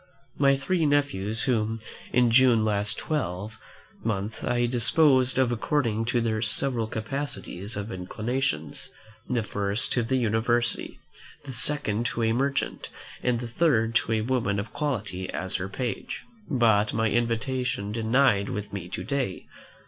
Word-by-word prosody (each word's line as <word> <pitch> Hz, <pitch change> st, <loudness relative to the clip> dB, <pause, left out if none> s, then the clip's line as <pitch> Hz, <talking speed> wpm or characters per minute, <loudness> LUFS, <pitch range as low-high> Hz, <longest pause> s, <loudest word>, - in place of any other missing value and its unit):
My 140 Hz, -1 st, +5 dB
three 165 Hz, +3 st, +1 dB
nephews, 115 Hz, -7 st, +1 dB
whom, 115 Hz, -3 st, 0 dB, 0.3 s
in 125 Hz, -1 st, +4 dB
June 120 Hz, -3 st, +5 dB
last 105 Hz, -1 st, 0 dB
twelve 110 Hz, -, -3 dB, 0.4 s
month, 110 Hz, 0 st, -2 dB
I 120 Hz, 0 st, +1 dB
disposed 130 Hz, +2 st, +4 dB
of 130 Hz, -2 st, +3 dB
according 115 Hz, -3 st, 0 dB
to 120 Hz, +1 st, +1 dB
their 110 Hz, -1 st, 0 dB
several 115 Hz, +1 st, +1 dB
capacities 110 Hz, -4 st, -4 dB
and 100 Hz, +2 st, -4 dB
inclinations; 105 Hz, -, -3 dB, 0.4 s
the 120 Hz, -3 st, +1 dB
first 100 Hz, +1 st, -1 dB
to 125 Hz, -, +2 dB
the 120 Hz, +3 st, 0 dB
university, 120 Hz, 0 st, +1 dB, 0.5 s
the 135 Hz, -, -6 dB
second 120 Hz, -4 st, +2 dB
to 115 Hz, -, -2 dB
a 115 Hz, 0 st, +2 dB
merchant, 140 Hz, +3 st, -1 dB, 0.3 s
and 125 Hz, -2 st, 0 dB
the 120 Hz, -, -4 dB
third 115 Hz, -4 st, +2 dB
to 115 Hz, -, -1 dB
a 110 Hz, -, +1 dB
woman 110 Hz, -4 st, 0 dB
of 105 Hz, -, -6 dB
quality 105 Hz, -11 st, -3 dB
as 95 Hz, 0 st, -2 dB
her 95 Hz, 0 st, -4 dB
page, 120 Hz, +4 st, -4 dB, 0.3 s
by 115 Hz, -7 st, +4 dB
my 110 Hz, 0 st, +1 dB
invitation 120 Hz, -2 st, -1 dB
dined 110 Hz, -2 st, +2 dB
with 105 Hz, -1 st, -5 dB
me 90 Hz, -3 st, -5 dB
to -, -, -4 dB
day. 130 Hz, -9 st, -2 dB
115 Hz, 145 wpm, -26 LUFS, 105-130 Hz, 0.5 s, My